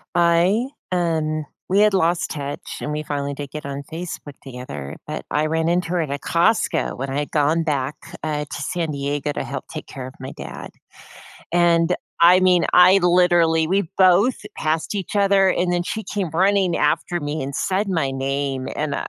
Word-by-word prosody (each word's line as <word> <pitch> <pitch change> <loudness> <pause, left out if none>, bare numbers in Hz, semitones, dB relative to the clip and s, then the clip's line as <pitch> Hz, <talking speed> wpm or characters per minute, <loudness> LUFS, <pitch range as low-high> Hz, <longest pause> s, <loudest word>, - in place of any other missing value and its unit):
I, 175 +7 +3 0.2
um 160 -3 0 0.2
we 195 +2 +3
had 210 0 +5
lost 170 -2 +1
touch, 145 -1 -6
and 150 - -4
we 150 0 -3
finally 140 -1 -3
did 140 0 -7
get 150 -1 -7
on 140 0 -5
Facebook 160 -4 -7
together, 125 - -8
but - - -6
I 150 +2 +1
ran 160 +1 0
into 175 0 +1
her 175 -1 +1
at 155 - -3
a 140 - -2
Costco, 170 +9 +1
when 135 +2 -4
I 135 +2 -1
had 145 - -4
gone 155 +2 +2
back, 145 -3 -1 0.3
uh, 150 -1 -2
to 145 - -7
San 165 +1 -2
Diego 145 +1 -2
to - - -3
help - - -6
take - - -7
care 130 -1 -8
of 130 - -11
my 130 - -7
dad. - - -8 0.8
And, 170 0 +3 0.2
I 175 +2 +7
mean, 185 -1 +4
I 180 +2 +7
literally 175 -3 +3
we 190 0 0
both 190 +6 +5 0.2
passed 160 +5 -1
each 200 0 -3
other, 195 -1 +4
and 180 -1 +1
then 175 0 +1
she 215 +5 -4
came 195 -5 -3
running 190 +2 +2
after 150 +4 0
me 145 -1 -3
and 135 +1 -4
said 195 +2 0
my 160 -8 0
name, 135 0 -2
and, 150 -1 -2
165 Hz, 190 wpm, -21 LUFS, 145-180 Hz, 0.8 s, I